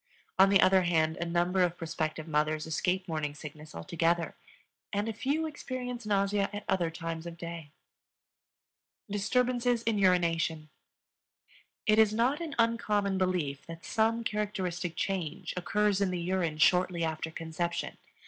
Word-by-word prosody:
On 195 +1 +8
the 195 -1 +5
other 190 0 +6
hand, 160 -2 +2
a 175 - -2
number 175 +2 +1
of 175 -1 +2
prospective 155 -1 -3
mothers 155 0 0
escape 180 +4 -1
morning 155 -3 -2
sickness 150 +1 -10
altogether, 165 - 0 0.6
and 205 +1 -1
a 225 - -2
few 285 +7 -1
experience 250 -6 -5
nausea 200 0 +1
at 205 0 -5
other 180 -3 +1
times 165 0 -5
of 170 0 -8
day. 170 -2 -7 1.4
Disturbances 245 +3 +1
in 225 -3 +1
Urination. 165 -4 +2 1.2
It 215 0 +4
is 215 -1 +5
not 255 +7 +2
an 315 -4 -5
uncommon 210 -4 +1
belief 175 -7 -1
that 165 0 -9
some 225 +1 +1
characteristic 185 -5 -2
change 180 -1 -3
occurs 200 +2 +1
in 195 - +2
the 180 -1 -2
urine 170 -3 -1
shortly 180 +2 +3
after 160 0 -2
conception. 165 +1 -3
180 Hz, 140 wpm, -30 LUFS, 165-210 Hz, 1.4 s, On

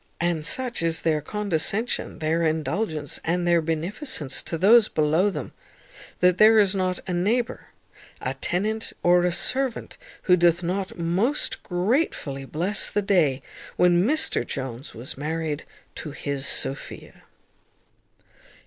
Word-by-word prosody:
And 170 -2 0
such 250 +5 -1
is 165 -1 0
their 155 -2 +1
condescension, 210 - -2
their 160 +1 0
indulgence, 155 0 -2
and 175 +2 0
their 170 -1 +4
beneficence 160 - -2
to 165 - -4
those 215 +5 +6
below 155 +6 +2
them, - - -6 0.7
that 180 0 +4
there 220 +1 +7
is 200 -2 +4
not 185 -2 -1
a 180 - -2
neighbour, 225 +8 -1 0.5
a - - -3
tenant, 215 +5 -2
or 175 0 +4
a 180 - +2
servant, 255 +7 -1 0.3
who 180 - +5
doth 175 0 +3
not 190 +3 -3
most 185 - 0
gratefully 180 - -1
bless 180 +9 0
the 205 - -1
day 155 -10 +2 0.3
when 175 0 +4
Mr 310 +8 +1
Jones 130 -1 -6
was 125 +3 -7
married 155 0 -3 0.3
to 155 - -7
his 140 -1 -2
Sophia. 135 - -2
175 Hz, 130 wpm, -24 LUFS, 155-205 Hz, 0.7 s, there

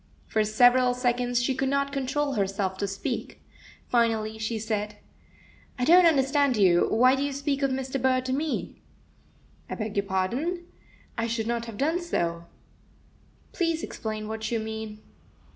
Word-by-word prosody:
For 215 - +1
several 245 +3 +4
seconds 245 -1 0
she 265 - +1
could 265 +1 -1
not 280 0 0
control 280 +1 -1
herself 195 -2 -1
to 200 - -1
speak. 195 0 -4 0.5
Finally, 220 -2 +1
she 220 +1 -2
said 210 -1 -3 0.8
"I 250 - 0
don't 350 +3 +7
understand 275 -3 +2
you. 180 -4 +4
Why 255 +3 +5
do 270 - 0
you 285 0 -1
speak 280 0 -2
of 275 - +2
Mr. 265 0 -3
Burr 255 0 +3
to 255 0 -3
me?" 300 +3 -3 0.9
"I - - -3
beg 210 -2 -2
pardon. 255 - -1 0.6
I 230 - 0
should 225 -1 -2
not 235 0 -2
have 225 -3 -8
done 320 - 0
so." 170 - -2 1.1
"Please 330 -2 0
explain 215 -1 -5
what 220 +1 -4
you 235 - +1
mean. 220 -1 -6
245 Hz, 155 wpm, -26 LUFS, 215-275 Hz, 1.1 s, don't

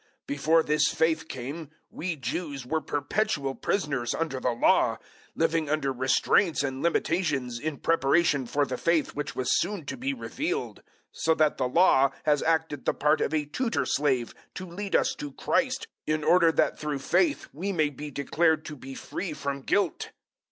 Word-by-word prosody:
003:023 - - -35 0.2
Before 155 +3 +2
this 150 0 +2
faith 160 0 +1
came, 140 +5 -6 0.2
we 175 0 -3
Jews 140 -2 -4
were 160 +5 -1
perpetual 145 -1 -1
prisoners 140 - -1
under 160 -5 -2
the 125 - 0
Law, 120 -1 +3 0.4
living 160 -2 +1
under 145 -3 0
restraints 135 +6 +2
and 135 -1 -3
limitations 150 -8 0
in 150 +2 -3
preparation 145 -3 +2
for 145 +3 +1
the - - -4
faith 165 -2 +2
which 145 -1 -4
was 130 - +1
soon 185 -3 -3
to - - -4
be 265 +2 -2
revealed. 320 - -3
003:024 - - -26 0.3
So 160 - +1
that 155 -1 +2
the 130 - +1
Law 140 -2 +5
has 150 -2 +2
acted 160 -3 0
the - - +1
part 150 +1 +2
of - - 0
a 155 -2 0
tutor 230 - -1
slave 135 -5 0 0.2
to 185 - -5
lead 190 +3 -4
us - - +3
to 145 -2 -6
Christ, 260 - 0 0.2
in 155 0 0
order 170 0 +5
that - - +1
through 150 -2 -2
faith 290 - +1
we 185 +8 -3
may 155 -5 +1
be 145 +2 -7
declared 155 +3 +1
to 155 - -6
be 135 0 -9
free 180 +3 -5
from 140 -1 -4
guilt. 190 +5 0
155 Hz, 180 wpm, -27 LUFS, 140-170 Hz, 0.4 s, Law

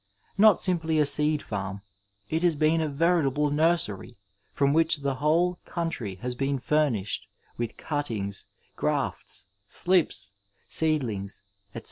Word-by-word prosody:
Not 215 0 +6
simply 165 -4 +1
a 150 - +4
seed 150 +1 +5
farm, 100 -1 -5 0.5
it 160 +1 -1
has 175 -3 +2
been 155 +2 +2
a 155 - -1
veritable 150 -2 +1
nursery 155 - 0 0.3
from 140 0 +1
whiob 160 -2 +2
the 140 -1 0
whole 175 +4 +2
coun 170 -1 -2
try 100 - -5
has 125 0 -3
been 135 +2 -1
furnished 120 -9 0 0.3
with 120 -1 -4
cuttings, 110 -10 -4 0.3
grafts, - - -2 0.2
slips, 155 - 0 0.4
sisedlings, 120 -13 -1 0.3
etc. - - -4
150 Hz, 130 wpm, -26 LUFS, 115-160 Hz, 0.5 s, Not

